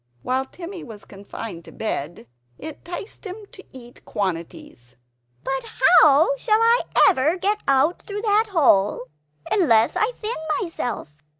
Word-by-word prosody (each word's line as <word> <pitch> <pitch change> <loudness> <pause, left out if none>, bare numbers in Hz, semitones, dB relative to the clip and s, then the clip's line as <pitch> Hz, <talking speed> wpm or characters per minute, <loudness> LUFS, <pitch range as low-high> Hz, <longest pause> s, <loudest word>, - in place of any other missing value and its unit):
While 260 +1 -1
Timmy 350 +5 -9
was 220 -4 -11
confined 195 -2 -9
to - - -12
bed, 165 - -4 0.3
it 310 +1 -9
'ticed 355 +5 -8
him 410 +1 -8
to 390 - -13
eat 245 -2 -13
quantities 165 -9 -5 0.5
"But 270 0 -2 0.4
how 315 - +5
shall 435 -3 +2
I 460 +2 +4 0.3
ever 320 -1 +2
get 410 +3 0
out 275 +5 +2
through 415 0 -6
that 430 +1 +2
hole 250 - +3 0.5
unless 235 - +3
I 430 +3 +1
thin 440 +2 -4 0.3
myself? 245 - -5
300 Hz, 135 wpm, -22 LUFS, -, 0.5 s, how